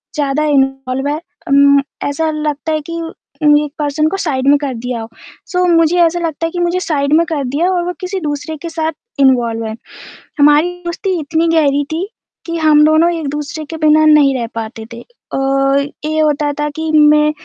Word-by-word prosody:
ज़्यादा 290 0 0
इन्वॉल्व 270 -1 0
है 295 - 0 0.3
उम, 280 0 +5 0.2
ऐसा 315 +3 -1
लगता 305 0 -3
है 310 - 0
कि 335 - -4 0.5
में 295 0 +5
एक 295 - -6
पर्सन 300 +1 0
को 390 - -3
साइड 275 -7 -2
में 290 +1 +6
कर 275 -3 -2
दिया 240 0 -4
हो। 225 - -8 0.4
सो 360 0 +1
मुझे 335 0 +3
ऐसा 340 +1 +2
लगता 330 -1 -3
है 330 - -3
कि 355 - -4
मुझे 350 +1 0
साइड 290 -4 -1
में 335 - +3
कर 295 -4 -2
दिया 290 +8 0
हो 375 - +1
और 350 - 0
वो 360 - -3
किसी 375 +1 -3
दूसरे 300 0 -4
के 335 - -5
साथ 320 -1 -2 0.3
इन्वॉल्व 240 -4 +2
है। 220 - -5 0.6
हमारी 295 +4 +4
दोस्ती 360 +2 -2
इतनी 320 +2 0
गहरी 290 -3 +2
थी, 360 +5 -2 0.4
कि 335 -1 -3
हम 305 -1 +4
दोनों 315 +3 +4
एक-दूसरे 300 0 -5
के 325 - -5
बिना 310 0 +4
नहीं 295 -3 +5
रह 235 - -3
पाते 225 0 -6
थे 235 - -10 0.3
और 275 +1 +1 0.3
ये 310 0 -1
होता 295 -1 +1
था 295 - 0
कि 320 0 -3
मैं 300 0 +5
300 Hz, 200 wpm, -15 LUFS, 280-325 Hz, 0.6 s, में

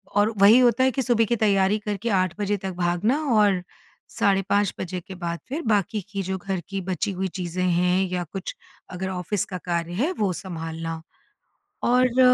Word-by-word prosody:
और 210 +2 +3
वही 205 +5 +7
होता 245 0 +4
है 260 - +4
कि 265 - -1
सुबह 235 -2 +2
की 235 - +1
तैयारी 205 -1 +2
करके 210 +2 -3
8 185 -1 -2
बजे 205 0 0
तक 190 0 -5
भागना 175 - +1
और 205 -4 +4 0.6
साढ़े 195 -1 +3
5 205 -1 +2
के 185 +1 -6
बाद 170 -1 -4
फिर 305 +5 -3
बाकी 205 +1 0
की 200 -1 -3
जो 190 +1 -2
घर 190 0 -3
की 195 -1 -3
बची 195 +3 -1
हुई 190 +1 -2
चीज़ें 180 -1 -3
हैं 180 +1 +2
या 180 -1 -2
कुछ 190 +3 -6 0.3
अगर 190 +1 -4
ऑफ़िस 185 +2 -2
का 185 - -5
कार्य 170 -1 -3
है, 275 - 0
वो 210 - 0
संभालना। 165 -2 -5 0.8
और 250 +1 +3
195 Hz, 185 wpm, -24 LUFS, 180-210 Hz, 0.8 s, वही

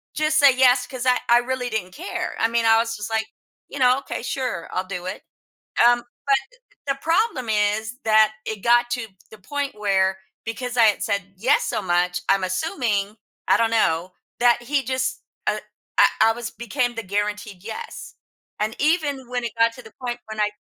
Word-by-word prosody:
just 310 0 +1
say, 285 -2 +7
"Yes," 255 -1 +5
'cause 255 -2 -6
I 250 -1 +4
I 240 - +7
really 250 0 -2
didn't 185 -5 -3
care, 360 +2 -4
I 225 - +2
mean, 230 0 +1
I 225 0 +6
was 230 -1 -1
just, 210 +1 -5
like, 220 0 -1 0.4
you 285 - -7
know, 250 0 +5
"Okay, - - -6
sure, 250 -11 -3
I'll 185 - 0
do 180 -2 -5
it." - - -5 0.7
Um, 240 0 +5 0.3
but, 275 - +5
uh - - -8 0.4
uh, - - -7
the - - -17
problem 330 - +1
is 215 +3 0
that 215 0 +5
it 220 - -2
got 240 0 +4
to 245 -2 -2 0.2
the 220 - -13
point 285 +6 -4
where 190 -2 +1 0.3
because 245 +2 -4
I 230 - +7
had 210 - +2
said, 200 -1 0
"Yes," 255 +9 +3
so - - -1
much, 180 0 +1
I'm 195 -1 +3
assuming 210 - -1 0.3
I - - +6
don't 230 -1 +2
know 180 -5 +1 0.3
that 240 0 +4
he 275 +1 +1
just, 260 +1 -2 0.2
uh 215 - +1 0.4
I - - +9 0.2
I 225 0 +6
was 240 0 -6
became 240 +1 -2
the 230 - -3
guaranteed 205 -1 -3
"Yes." 220 0 -7 0.5
And, 215 +1 -1
even 290 -5 +1
when 245 -1 -2
it 230 - -3
got 230 0 +4
to 250 - -11
the 220 - -14
point 245 -1 -3
when 220 0 -5
I 210 0 +2
230 Hz, 200 wpm, -23 LUFS, 210-255 Hz, 0.7 s, I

